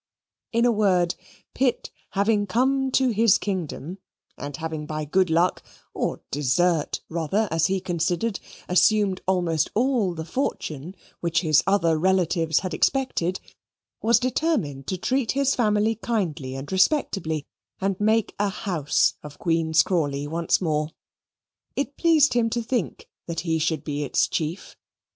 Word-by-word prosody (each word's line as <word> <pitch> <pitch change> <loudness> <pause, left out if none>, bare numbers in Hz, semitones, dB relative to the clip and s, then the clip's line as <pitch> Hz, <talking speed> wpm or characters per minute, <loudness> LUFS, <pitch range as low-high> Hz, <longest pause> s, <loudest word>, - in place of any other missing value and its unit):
In 235 +1 +2
a 245 - +4
word, 185 -5 +2 0.4
Pitt 250 -2 0 0.2
having 205 0 +2
come 265 +6 +1
to 260 -1 +3
his 225 -2 +4
kingdom, 180 -2 -4 0.4
and 145 -1 -6
having 160 -2 -5
by 155 0 -3
good 185 +4 +2
luck, 170 +3 +2 0.3
or - - -2
desert 150 +4 +1
rather, 170 +6 0
as 165 -1 +2
he 195 0 0
considered, 175 +4 -1 0.3
assumed 195 +1 +3
almost 175 -4 +1
all 230 -6 +1
the 160 -1 -5
fortune 170 - -3 0.2
which 170 0 0
his 155 -5 +3
other 170 -5 +2
relatives 170 -3 +2
had 185 -3 -4
expected, 185 - 0 0.6
was 230 0 +4
determined 250 - -1
to 185 - -2
treat 255 +5 0
his 275 0 +2
family 215 -1 +2
kindly 180 - -3
and 135 +5 -7
respectably 190 - +1 0.3
and 195 -1 -1
make 220 +1 +2
a 205 0 +2
house 175 -7 +1
of 150 -1 -11
Queen's 165 -2 +2
Crawley 145 -6 -1
once 165 +3 0
more. 155 -3 0 0.9
It 280 0 -2
pleased 320 -3 +4
him 235 -2 +2
to 235 +1 -2
think 230 -5 -3 0.2
that 170 -1 -3
he 160 -2 0
should 160 -2 -1
be 145 -1 -3
its 140 - +1
chief. 160 +4 -4
185 Hz, 145 wpm, -24 LUFS, 160-220 Hz, 0.9 s, a